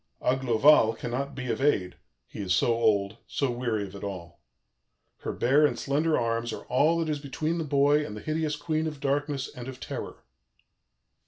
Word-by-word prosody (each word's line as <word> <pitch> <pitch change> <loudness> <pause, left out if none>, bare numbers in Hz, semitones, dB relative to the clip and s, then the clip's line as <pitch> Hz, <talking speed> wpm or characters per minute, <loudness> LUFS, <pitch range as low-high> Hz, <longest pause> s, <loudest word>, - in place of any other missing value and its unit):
Aglovale 125 -1 +4
cannot 135 +4 -4
be 125 -2 -3
of - - -3
aid, 100 -11 +1 0.3
he - - -11
is 90 -2 +1
so 115 - +3
old, 105 -2 +1
so 140 -3 -1
weary 120 -3 -1
of 100 -1 -8
it 100 - -9
all. 90 -4 -7 0.8
Her - - -4
bare 140 +5 +3
and 150 - +2
slender 150 +3 +1
arms 115 0 -1
are - - -7
all 150 +6 +3
that 165 -1 -1
is 150 -2 -1
between 155 +4 -2
the - - -1
boy 145 0 +3
and 105 -7 -6
the - - -8
hideous 155 +1 -1
Queen 155 +1 -1
of 150 -2 -6
Darkness 140 0 -1
and 125 0 -9
of 130 -1 -8
Terror. - - -7
135 Hz, 185 wpm, -27 LUFS, 115-150 Hz, 0.8 s, Aglovale